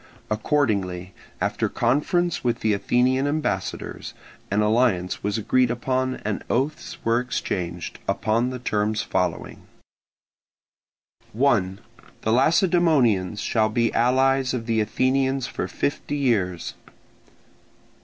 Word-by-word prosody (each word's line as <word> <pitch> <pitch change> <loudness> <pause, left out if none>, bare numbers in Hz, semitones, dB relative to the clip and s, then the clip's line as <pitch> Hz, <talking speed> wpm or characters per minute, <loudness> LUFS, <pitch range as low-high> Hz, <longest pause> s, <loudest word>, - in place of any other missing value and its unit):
Accordingly, 100 - 0 0.3
after - - -1
conference 155 +8 +1
with 120 -2 0
the 110 -1 +2
Athenian 125 +6 +2
ambassadors, 125 -11 -3 0.3
an 100 +2 +1
alliance 105 -5 +1
was 105 +1 -1
agreed 125 +3 +2
upon 130 +2 -1
and 105 -1 -2
oaths 150 +7 -2
were 115 +1 +3
exchanged, 90 -8 -4
upon 115 +3 +1
the 130 - -4
terms 110 -2 -1
following: 90 -2 -2 1.7
1. 105 -7 +1 0.4
The 110 - +1
Lacedaemonians 135 - +3
shall 110 -2 +1
be 115 +1 +1
allies 130 +2 +2
of 115 -2 -4
the 115 -1 +1
Athenians 130 +4 +1
for 90 - -4
fifty 140 +8 -2
years. 100 -10 0
120 Hz, 105 wpm, -24 LUFS, 105-130 Hz, 1.7 s, were